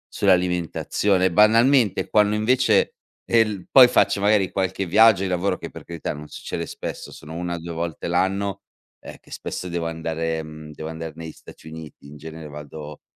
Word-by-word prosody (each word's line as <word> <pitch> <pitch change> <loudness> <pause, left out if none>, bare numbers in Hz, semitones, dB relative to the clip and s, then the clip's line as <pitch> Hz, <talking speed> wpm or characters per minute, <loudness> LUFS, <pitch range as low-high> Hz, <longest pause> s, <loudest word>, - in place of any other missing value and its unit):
sull'alimentazione 90 +1 +1
e 95 - +2
banalmente 115 +3 +4
e - - -7
quando 105 -1 +3
invece, 110 0 +2 0.3
è 115 - +2
il 105 -5 +1
poi 130 -2 +9
faccio 100 - +2
magari 100 -2 +2
qualche 95 0 -2
viaggio 105 +2 +5
di - - -1
lavoro, 90 +2 0
che - - -8
per - - -11
carità, 85 -2 -5
non 75 +1 -10
succede 85 - -6
spesso, - - -7
sono 75 +2 -11
1-2 85 -1 -5
volte 85 -1 -4
l'anno, 95 +3 -1 0.4
eh, - - -10
che - - -21
spesso 90 - -6
devo 85 -1 -3
andare, 80 0 -3
uhm, 75 0 -10
devo 80 +2 -7
andar 80 0 -7
negli 80 -1 -8
Stati - - -15
Uniti, 80 -2 -11
in 75 +1 -12
genere 80 +1 -9
vado 75 0 -9
85 Hz, 180 wpm, -23 LUFS, 80-100 Hz, 0.4 s, poi